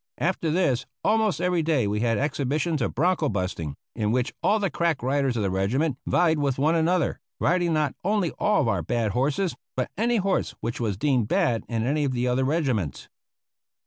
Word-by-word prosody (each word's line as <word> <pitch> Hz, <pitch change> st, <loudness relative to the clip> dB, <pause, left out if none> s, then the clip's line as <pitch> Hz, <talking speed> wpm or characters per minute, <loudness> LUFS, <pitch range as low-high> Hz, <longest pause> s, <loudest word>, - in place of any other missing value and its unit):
After 170 Hz, +2 st, 0 dB
this 150 Hz, -7 st, +1 dB, 0.2 s
almost 220 Hz, -2 st, +2 dB
every 180 Hz, -2 st, +1 dB
day 155 Hz, -7 st, +1 dB
we 105 Hz, +1 st, -1 dB
had 115 Hz, -1 st, +1 dB
exhibitions 145 Hz, +3 st, -1 dB
of -, -, -1 dB
bronco 165 Hz, -1 st, +2 dB
busting, 90 Hz, -7 st, -3 dB, 0.2 s
in 105 Hz, -1 st, 0 dB
which 125 Hz, +1 st, 0 dB
all 210 Hz, -, +3 dB
the 200 Hz, -5 st, -1 dB
crack 165 Hz, -7 st, 0 dB
riders 135 Hz, -1 st, +1 dB
of 110 Hz, -, 0 dB
the 95 Hz, -, 0 dB
regiment 125 Hz, -, 0 dB
vied 160 Hz, -3 st, +3 dB
with 140 Hz, -3 st, 0 dB
one 150 Hz, +4 st, +2 dB
another, 170 Hz, 0 st, +1 dB, 0.2 s
riding 175 Hz, -1 st, +2 dB
not 150 Hz, -3 st, +1 dB
only 200 Hz, -3 st, +1 dB
all 210 Hz, -4 st, +3 dB
of 130 Hz, -, 0 dB
our -, -, +1 dB
own -, -, -6 dB
bad 115 Hz, -3 st, 0 dB
horses 145 Hz, -, 0 dB, 0.2 s
but -, -, -2 dB
any 235 Hz, +1 st, +2 dB
horse 195 Hz, -2 st, 0 dB
which 115 Hz, +1 st, -4 dB
was 105 Hz, -5 st, -1 dB
deemed 125 Hz, -3 st, +1 dB
bad 160 Hz, -, +1 dB
in 115 Hz, -2 st, -1 dB
any 145 Hz, +3 st, +1 dB
of 135 Hz, -2 st, 0 dB
the 125 Hz, 0 st, 0 dB
other 125 Hz, +1 st, +1 dB
regiments. 130 Hz, -, -1 dB
145 Hz, 200 wpm, -25 LUFS, 120-170 Hz, 0.2 s, all